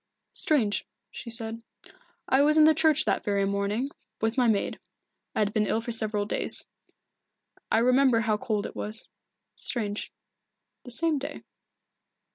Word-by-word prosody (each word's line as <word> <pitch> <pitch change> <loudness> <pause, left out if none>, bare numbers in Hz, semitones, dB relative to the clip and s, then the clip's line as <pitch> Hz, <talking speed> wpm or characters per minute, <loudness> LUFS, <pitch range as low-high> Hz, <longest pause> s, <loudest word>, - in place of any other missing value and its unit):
"Strange," 235 -10 +1 0.2
she 240 - -8
said. 230 0 -3 0.7
"I 265 - +4
was 305 +2 +4
in 310 - +8
the 315 +1 +7
church 315 -1 +3
that - - +1
very 200 -1 +1
morning, 200 +7 -1 0.3
with 225 +1 0
my 250 -2 +3
maid. 215 -3 0 0.6
I - - 0
had 205 0 +1
been 210 -2 +1
ill 220 - +1
for 230 +1 -5
several 215 -2 0
days - - -1 1.1
I - - +4
remember 250 0 +4
how 220 -1 +1
cold 210 -3 -2
it - - -7
was. 215 +1 -4 0.5
Strange 210 -4 -2 0.7
the - - -8
same 310 +4 +1
day." 285 +2 -7
230 Hz, 150 wpm, -27 LUFS, 210-265 Hz, 1.1 s, in